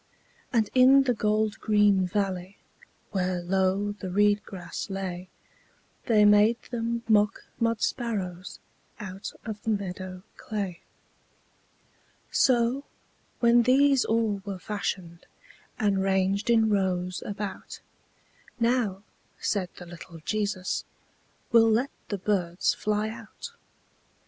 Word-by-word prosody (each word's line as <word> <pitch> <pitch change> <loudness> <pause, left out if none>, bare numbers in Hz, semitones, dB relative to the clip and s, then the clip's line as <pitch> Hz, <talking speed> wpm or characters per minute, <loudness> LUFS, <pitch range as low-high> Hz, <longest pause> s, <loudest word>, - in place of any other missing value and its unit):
And 225 -4 +2
in 265 +2 +7
the 250 -2 +2
gold 215 -1 0
green 205 -3 +3
valley, 190 -1 -2 0.5
Where 185 -2 0
low 190 +3 +1
the 205 -2 -7
reed 205 +2 +3
grass 185 0 -7
lay, 185 -2 -5 0.8
They 215 -3 +5
made 210 +3 +5
them 235 -1 -2
mock 210 -2 +3 0.2
mud 230 -1 +1
sparrows 195 -7 -3 0.4
Out 195 0 -6
of 215 -2 -5
the - - -3
meadow 185 -3 -3
clay. 200 -5 -4 1.5
So, 250 +2 +3 0.6
when 235 0 +6
these 270 +2 +4
all 220 -3 0
were 200 -2 -5
fashioned, 185 -4 -5 0.5
And 200 -4 +1
ranged 195 +2 +1
in 225 -2 +4
rows 185 -2 0
about, 200 -2 -6 0.8
"Now," 230 -5 +1 0.4
said 190 -4 -1
the 180 - -10
little 170 0 -11
Jesus, 205 -3 -1 0.7
"We'll 225 -1 +6
let 240 +6 +1 0.2
the 205 - -3
birds 180 -3 0
fly 210 0 -1
out." 230 - -9
205 Hz, 110 wpm, -27 LUFS, 190-225 Hz, 1.5 s, in